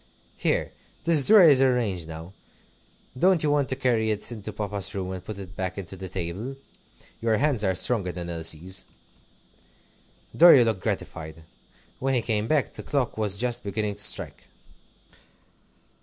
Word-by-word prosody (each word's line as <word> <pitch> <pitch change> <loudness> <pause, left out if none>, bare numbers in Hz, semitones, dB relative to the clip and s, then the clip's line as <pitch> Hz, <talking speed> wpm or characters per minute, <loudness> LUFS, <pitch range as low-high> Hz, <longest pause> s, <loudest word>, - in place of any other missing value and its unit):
"Here, - - 0 0.3
this 160 -5 +5
drawer 215 -3 +8
is 145 -5 +6
arranged 115 -10 +1
now. 80 +3 -9 0.8
Don't 180 +4 +3
you 150 - +2
want 145 -2 +1
to 130 - -1
carry 120 -4 +1
it 105 +2 -3
into 110 -2 -7
Papa's 100 -2 -3
room 95 -1 -3
and 95 -1 -6
put 105 +1 -7
it 95 -1 -10
back 95 0 -4
into 95 -1 -7
the 95 0 -8
table? 95 +8 -5 0.7
Your 115 -1 +1
hands 135 -3 +1
are 95 -2 +1
stronger 100 -2 0
than 85 -1 -6
Elsie's." 85 +2 -2 1.5
Dorry 165 -7 +8
looked 110 -5 -1
gratified. 80 -1 -5 0.6
When 135 0 0
he 120 - 0
came 110 -1 -1
back 150 -1 0
the - - -7
clock 140 -5 -2
was 105 -3 -1
just 120 +2 -2
beginning 105 +1 -2
to 105 +1 -4
strike. - - -1
105 Hz, 155 wpm, -25 LUFS, 95-125 Hz, 1.5 s, drawer